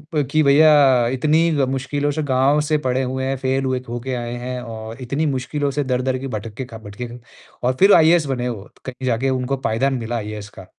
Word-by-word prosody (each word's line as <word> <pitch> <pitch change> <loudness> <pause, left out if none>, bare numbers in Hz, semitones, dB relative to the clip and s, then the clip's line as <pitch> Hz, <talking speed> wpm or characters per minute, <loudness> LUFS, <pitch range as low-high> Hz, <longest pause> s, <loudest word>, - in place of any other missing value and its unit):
अ, 150 - +3
कि 155 - +3
भैया 140 -4 +5
इतनी 155 +5 +2
ग 140 - +1
मुश्किलों 140 +2 -1
से 155 - -2
गाँव 135 +2 +2
से 155 +1 +1
पढ़े 130 +1 +1
हुए 130 +1 -3
हैं, 135 0 -1
फेल 135 +1 -1
हुए 130 -1 0
होके 120 +2 -4
आए 120 0 -4
हैं, 125 0 -4
और 115 +1 -8
इतनी 140 +6 -1
मुश्किलों 140 +2 -2
से 145 +1 -1
दर-दर 130 0 0
के 135 - -5
भटक 105 +1 -6
के 130 - -4
खा 115 -2 -10
भटके 105 +4 -7
खा 120 +1 -10 0.5
और 130 - +2
फिर 200 +1 +7
आईएएस 165 -1 +5
बने 125 -2 -2
वो, 105 -5 -6 0.2
कहीं 130 0 -6
जाके 125 +3 +1
उनको 130 +1 -1
पायदान 135 +5 +1
मिला 120 +1 -3
आईएएस 105 -1 -6
का। 95 - -10
130 Hz, 220 wpm, -20 LUFS, 120-140 Hz, 0.5 s, फिर